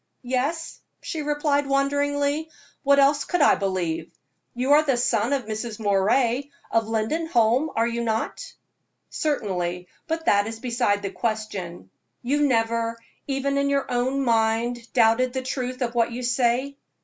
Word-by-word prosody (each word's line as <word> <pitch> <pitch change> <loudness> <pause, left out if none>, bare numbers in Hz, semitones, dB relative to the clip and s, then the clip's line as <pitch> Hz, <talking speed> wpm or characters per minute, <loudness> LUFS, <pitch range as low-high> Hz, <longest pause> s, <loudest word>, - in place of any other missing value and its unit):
"Yes," 270 +7 -2 0.2
she 315 - -4
replied, 290 -1 0
wonderingly, 285 +2 0 0.3
"what 280 0 +4
else 280 +1 +4
could 355 - -1
I 285 - +6
believe? 185 -4 -2 0.4
You 255 +3 0
are 295 +1 +7
the 275 -5 +1
son 240 0 +1
of 275 -4 0
Mrs. 215 +1 -5
Moray, 230 +6 +1 0.2
of 225 -1 +1
Lindenholm, 240 +3 +1
are 230 - +2
you 235 0 -2
not?" 225 -1 -3 0.6
"Certainly; 180 - -2 0.2
but 325 0 -3
that 205 +1 +3
is 225 0 -5
beside 230 -4 0
the 195 - -3
question. 195 - -4 0.3
You 290 +4 +2
never, 230 -1 0 0.3
even 275 0 0
in 280 0 +1
your 280 -2 0
own 255 +3 0
mind, 230 +1 0
doubted 245 +1 +3
the 260 -1 -2
truth 255 0 -3
of 235 -1 -2
what 235 -1 +1
you 245 +2 -5
say?" 250 +3 +1
245 Hz, 150 wpm, -24 LUFS, 225-280 Hz, 0.6 s, are